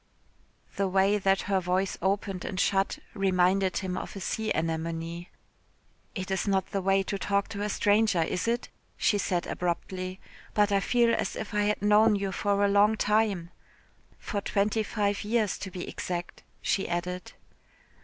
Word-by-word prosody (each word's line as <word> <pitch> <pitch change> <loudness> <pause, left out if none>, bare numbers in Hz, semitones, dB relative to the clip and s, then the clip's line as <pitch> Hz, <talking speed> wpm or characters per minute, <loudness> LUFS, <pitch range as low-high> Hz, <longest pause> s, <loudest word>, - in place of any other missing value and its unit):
The 195 - +1
way 195 +2 +3
that 195 0 +2
her 195 -1 +1
voice 185 +1 0
opened 195 -1 -1
and 185 - -4
shut 195 +1 +1 0.2
reminded 190 -1 +2
him 185 -2 -2
of - - -6
a - - -5
sea 215 +4 -2
anemone. 165 +1 -2 0.9
"It 190 -1 -4
is 190 +2 -1
not 195 -1 +1
the 195 - -1
way 195 +1 +3
to 200 +1 -3
talk 200 0 0
to 200 - -5
a 210 - -1
stranger, 205 -3 +3
is 180 +6 -2
it?" 235 +1 -1 0.3
she 205 - +2
said 180 -2 0
abruptly, 185 +1 -3 0.4
"but 210 0 +3
I 200 - +4
feel 235 +4 +3
as - - -1
if 220 - -6
I 210 0 +2
had 210 -1 0
known 210 +1 +5
you 200 -1 -2
for 200 +1 +1
a - - +4
long 205 +2 +4
time. 205 -6 +1 0.7
For 205 -3 -4
twenty 210 +2 +1
five 205 -1 -1
years, 215 -1 0
to 190 - -5
be 180 -1 -6
exact," 175 -1 -5 0.2
she 195 - 0
added. 180 +1 -3
195 Hz, 170 wpm, -28 LUFS, 185-205 Hz, 0.9 s, known